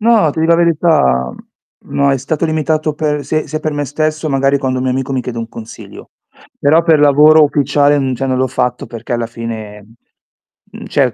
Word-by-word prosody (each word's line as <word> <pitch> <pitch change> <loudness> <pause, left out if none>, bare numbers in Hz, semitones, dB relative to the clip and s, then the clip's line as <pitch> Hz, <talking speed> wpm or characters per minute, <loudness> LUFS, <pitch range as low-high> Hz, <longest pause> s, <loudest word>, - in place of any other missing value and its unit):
No, 220 -8 +3
ti 160 - -4
di 160 - +2
la 170 0 +4
verità, 155 - +2
mhmm, - - -17
no 140 0 +2
è 135 - +1
stato 150 +5 -2
limitato 155 -1 -1
per 150 -2 -2
s 155 +2 -1
sia 155 - -4
per 155 -1 -2
me 145 0 -2
stesso, 155 +2 -2
magari 135 0 +1
quando 130 -2 -2
un 130 - -3
mio 130 - 0
amico 135 +1 -3
mi 130 - 0
chiede 120 -1 -6
un 115 - -5
consiglio. 115 -1 -11 0.5
Però 155 +4 +3
per 165 -2 +3
lavoro 150 +2 +6
ufficiale, 145 0 +2
mhmm, 130 -2 -1
cioè 135 +2 -3
non 130 -1 -1
l'ho 130 - 0
fatto 125 -1 -2
perché 115 +1 -8
alla 120 -1 -1
fine, 115 -3 -7
mhmm, 105 +2 -20 0.9
mhmm, - - -9
cioè 135 -4 +1
140 Hz, 215 wpm, -15 LUFS, 125-155 Hz, 0.9 s, lavoro